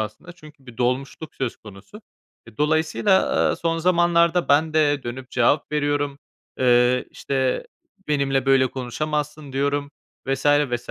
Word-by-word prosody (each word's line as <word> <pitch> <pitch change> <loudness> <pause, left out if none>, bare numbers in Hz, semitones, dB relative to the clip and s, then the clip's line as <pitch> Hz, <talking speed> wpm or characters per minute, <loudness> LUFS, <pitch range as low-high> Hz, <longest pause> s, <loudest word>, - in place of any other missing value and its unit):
aslında 110 - -6
çünkü 155 -5 -17
bir 120 -2 -12
dolmuşluk 135 +5 -2
söz 130 -3 -3
konusu. 105 - -14 0.4
E, 115 -2 -16
dolayısıyla, 160 - +2 0.3
aaa, - - -2
son 165 0 -1
zamanlarda 170 0 +2
ben 155 +2 +3
de 145 -3 +2
dönüp 125 +2 -7
cevap 140 +5 +1
veriyorum. 145 -1 -1 0.4
Eee, 125 0 +3
işte, 135 - -2 0.4
"Benimle 140 -2 0
böyle 135 -1 +4
konuşamazsın." 150 +3 -4
diyorum 140 +1 -1 0.4
vs, 135 +1 -2
vs. 145 -5 +1
145 Hz, 130 wpm, -22 LUFS, 130-155 Hz, 0.4 s, böyle